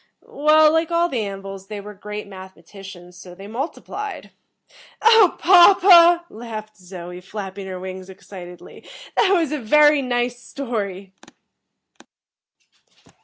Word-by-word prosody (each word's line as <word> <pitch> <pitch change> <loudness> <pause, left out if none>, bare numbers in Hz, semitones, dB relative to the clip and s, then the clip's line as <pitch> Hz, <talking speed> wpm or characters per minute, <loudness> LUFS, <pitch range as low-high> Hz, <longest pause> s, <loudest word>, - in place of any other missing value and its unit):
"Well, 305 +1 +3
like 325 0 0
all 340 0 +1
the 250 -7 -2
An 195 0 -8
vils, 195 0 -10
they 210 0 -7
were 210 +1 -10
great 210 +1 -8
mathematicians. 190 -1 -13
So, 180 -1 -13
they 195 +2 -12
multiplied." 305 - -7 0.7
"Oh, 450 -5 +5
papa," 350 -1 +6
laughed 215 -3 -9
Zoe, 180 -2 -10
flapping 195 0 -8
her 185 -1 -7
wings 185 0 -9
excitedly, 180 -2 -13 0.3
"that 395 - +2
was 335 -6 +1
a 300 - -3
very 295 +5 +4
nice 245 -1 -2
story!" 200 -9 -6
215 Hz, 120 wpm, -20 LUFS, 190-305 Hz, 0.7 s, papa